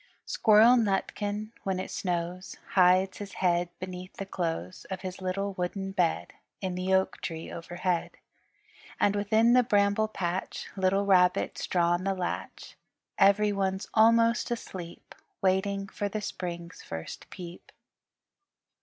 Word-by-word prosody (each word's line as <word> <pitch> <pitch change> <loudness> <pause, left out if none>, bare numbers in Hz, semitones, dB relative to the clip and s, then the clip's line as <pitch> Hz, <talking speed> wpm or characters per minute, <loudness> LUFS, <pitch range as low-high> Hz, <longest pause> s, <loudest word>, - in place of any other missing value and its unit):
Squirrel 225 +3 +6
Nutkin 210 0 -1
when 190 -1 -2
it 185 - -5
snows 180 0 -3
Hides 185 0 +4
his 200 -1 -7
head 175 -1 +1
beneath 185 0 -7
the 195 - -4
clothes 165 - -4
Of 190 -1 -4
his 185 0 -6
little 195 +2 -2
wooden 190 +2 -3
bed 180 -4 0 0.3
In 190 -2 -3
the 185 +1 -2
oak 190 0 +1
tree 165 -1 -5
overhead. 175 +1 -3 0.8
And 205 - +3
within 220 +3 +3
the 250 - +7
Bramble 205 -1 +2
Patch 185 -3 -3
Little 195 +1 +2
Rabbit's 180 -2 +3
drawn 175 0 +2
the 195 0 0
latch. 180 -1 -5 0.4
Everyone's 195 -1 +3
almost 230 +1 +4
asleep 185 -7 -7 0.3
Waiting 195 +1 +1
for 205 +1 -3
the 215 - -3
Spring's 175 -3 -6
first 80 0 -8
peep. 175 -2 -10
190 Hz, 125 wpm, -28 LUFS, 180-205 Hz, 0.8 s, the